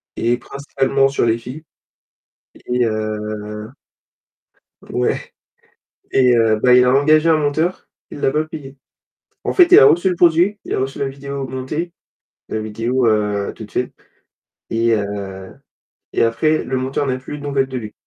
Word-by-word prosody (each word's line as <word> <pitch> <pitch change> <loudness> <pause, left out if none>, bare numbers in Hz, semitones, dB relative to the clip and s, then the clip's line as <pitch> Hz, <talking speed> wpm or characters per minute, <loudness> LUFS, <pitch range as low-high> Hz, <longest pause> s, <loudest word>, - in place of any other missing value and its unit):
et 120 +1 +1
principalement 135 +1 0
sur 135 - 0
les 115 0 +2
filles. 130 +7 -9 1.0
Et 125 -1 +1
heu 110 -1 -2 1.6
ouais. 60 - -2 0.8
Et 125 -2 +4
heu, 115 -1 +3
bah, 125 +1 +5
il 125 0 +6
a 125 - +3
engagé 155 +3 +4
un 160 - +5
monteur, 155 +4 -1 0.2
il 145 - -9
l'a - - +2
pas 155 +2 +1
payé. 145 -3 -10 0.7
En - - 0
fait, 360 -2 +6
il 390 - +11
a - - +8
reçu 175 +3 +4
le 180 - -1
produit, 175 +5 +3
il - - -4
a - - 0
reçu 135 +1 -3
la 140 - -1
vidéo 140 0 -6
montée, 150 +7 -4 0.6
la 110 - -2
vidéo, 115 +4 -1
heu, 105 -2 0
toute 110 -2 -10
seule 125 - -2 0.8
et 115 0 +2
heu 100 -2 -5 0.6
et - - +2
après 155 +8 +1
le 130 - -2
monteur 135 +2 -2
n'a 130 -1 -1
plus 130 +3 -8
de - - -11
nouvelles 140 -2 0
de 130 -1 -5
lui. 110 -3 -7
130 Hz, 165 wpm, -19 LUFS, 115-145 Hz, 1.6 s, il